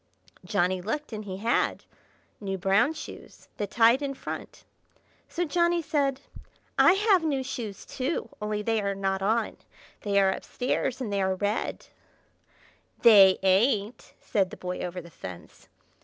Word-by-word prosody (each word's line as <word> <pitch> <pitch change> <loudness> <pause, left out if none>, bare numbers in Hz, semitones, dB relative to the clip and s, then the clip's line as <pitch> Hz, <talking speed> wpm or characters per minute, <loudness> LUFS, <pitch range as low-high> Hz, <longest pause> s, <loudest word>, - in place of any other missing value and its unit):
Johnny 185 -2 0
looked, 230 +7 -4
and 215 -1 -5
he 190 -2 -5
had; 230 +4 0 0.5
new 195 -2 -3
brown 195 - +3
shoes, - - -11
that 205 -2 -3
tied 235 +4 +4
in 275 -1 -3
front. - - -7 0.7
So 350 - -1
Johnny 345 +1 +1
said: 280 -3 0 0.5
"I - - +6
have 390 -3 +3
new 280 -4 0
shoes 225 -6 -6
too, 270 +5 -3
only 210 0 -2
they 225 0 +1
are 200 -1 -1
not 195 0 -1
on; 220 +3 0 0.4
they 200 -1 +2
are 190 -1 +3
up - - -8
stairs, 255 +1 -2
and 215 -5 -3
they 200 - +1
are 190 0 +1
red." 205 +3 -2 1.2
"They 200 -5 +8
ain't!" 205 +3 +1
said 195 -3 0
the - - -10
Boy 180 0 -5
Over 180 0 -4
the 170 0 -14
Fence. 90 - -11
210 Hz, 155 wpm, -27 LUFS, 195-260 Hz, 1.2 s, They